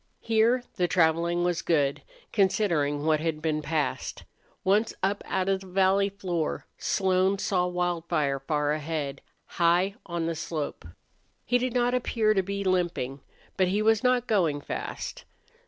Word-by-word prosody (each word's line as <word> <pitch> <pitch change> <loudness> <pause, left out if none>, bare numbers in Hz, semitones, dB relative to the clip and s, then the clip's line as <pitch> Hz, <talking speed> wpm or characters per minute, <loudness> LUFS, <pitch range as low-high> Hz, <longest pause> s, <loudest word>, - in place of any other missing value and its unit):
Here 230 +2 +3
the 180 - +2
traveling 170 0 +2
was 175 -1 0
good, 145 -4 +1 0.3
considering 170 -8 +1
what 155 -1 +3
had 160 -1 -2
been 155 -1 -1
passed. 155 -1 -2 0.4
Once 205 +4 +2
up 195 +1 +1
out 185 0 0
of 195 -1 +2
the 190 - -11
valley 195 +2 +3
floor 180 -5 -3
Slone 190 +1 +2
saw 180 -2 +1
Wildfire 170 -5 -1
far 150 +1 0
ahead, 150 -2 -3 0.2
high 175 +3 +2
on 170 -2 -2
the 165 - -1
slope. 155 - -4 0.6
He 245 +2 +2
did 250 0 -2
not 245 0 +2
appear 230 -3 +2
to 195 - +2
be 200 +1 -3
limping, 175 -8 0 0.4
but 185 -1 +3
he 205 +4 +1
was 220 -1 +3
not 250 -1 +3
going 175 -11 +1
fast. - - -5
180 Hz, 150 wpm, -27 LUFS, 160-200 Hz, 0.6 s, Here